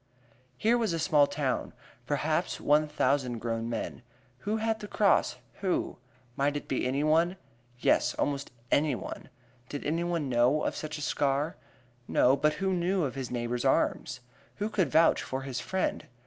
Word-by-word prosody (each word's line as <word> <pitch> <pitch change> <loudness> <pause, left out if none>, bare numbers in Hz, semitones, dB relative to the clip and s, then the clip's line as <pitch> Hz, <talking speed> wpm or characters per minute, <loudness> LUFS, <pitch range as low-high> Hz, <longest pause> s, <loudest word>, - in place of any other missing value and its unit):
Here 235 +3 +3
was 220 -7 0
a - - 0
small 150 -3 +4
town 140 -4 -2 0.3
perhaps - - 0
one 150 +1 +3
thousand 135 -4 +1
grown 115 0 -3
men. 115 0 -4 0.4
Who 210 - -1
had 220 0 0
the 210 - -7
cross 205 -1 +2 0.2
who? 190 -3 -1 0.4
Might 145 +1 +1
it - - -8
be 130 - 0
anyone? 155 +7 +2 0.4
Yes, - - +2
almost 140 -1 -1 0.2
anyone! 145 -3 0 0.4
Did 145 - -5
anyone 165 0 0
know 125 +4 +3
of - - -1
such 155 0 -5
a - - -7
scar? 145 +3 0 0.5
No, 130 +2 +4
but 150 +2 +2
who 190 +3 -1
knew 180 +1 +1
of 135 - -2
his 135 -3 -5
neighbor's 120 0 -2
arms? 130 -1 +1 0.3
Who 210 +1 -2
could 190 -5 +1
vouch 165 +2 +4
for 135 0 -4
his 130 -2 -4
friend? 190 +8 -2
145 Hz, 160 wpm, -29 LUFS, 130-175 Hz, 0.5 s, small